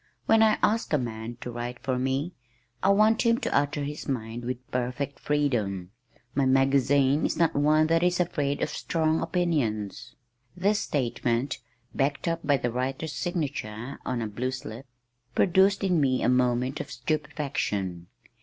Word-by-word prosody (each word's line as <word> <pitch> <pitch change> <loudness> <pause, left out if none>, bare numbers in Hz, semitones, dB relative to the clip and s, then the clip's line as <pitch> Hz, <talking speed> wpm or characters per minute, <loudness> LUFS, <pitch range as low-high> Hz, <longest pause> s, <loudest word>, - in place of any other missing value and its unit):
When 225 0 +5
I 220 -1 +5
ask 220 -5 +2
a - - +5
man 115 -2 -5
to 125 - -5
write 120 +1 -5
for 130 -2 0
me, 135 +6 -1 0.5
I 190 - +3
want 215 +3 +4
him 230 -1 +3
to - - -1
utter 145 +1 +1
his 145 +1 -5
mind 120 -3 -3
with 125 0 -5
perfect 125 +3 -2
freedom. 110 -11 -1 0.4
My 135 -1 +2
magazine 135 +1 +3
is - - 0
not 165 -1 +3
one 155 +2 +4
that 165 +1 +2
is 180 0 +2
afraid 145 -5 0
of - - -1
strong 160 0 0
opinions." 145 - -1 0.4
This 205 +3 +2
statement 125 -1 -1 0.3
backed 140 +3 0
up 165 0 0
by 145 -1 +3
the 120 -1 -2
writer's 135 +5 -3
signature 140 - -3
on 120 -2 -2
a - - -2
blue 120 +5 -2
slip 130 0 -7 0.5
produced 195 +2 +4
in 180 -5 +2
me 130 -2 +2
a - - +3
moment 125 +1 +1
of 140 - -5
stupefaction. 135 - -2
140 Hz, 160 wpm, -27 LUFS, 120-160 Hz, 0.5 s, When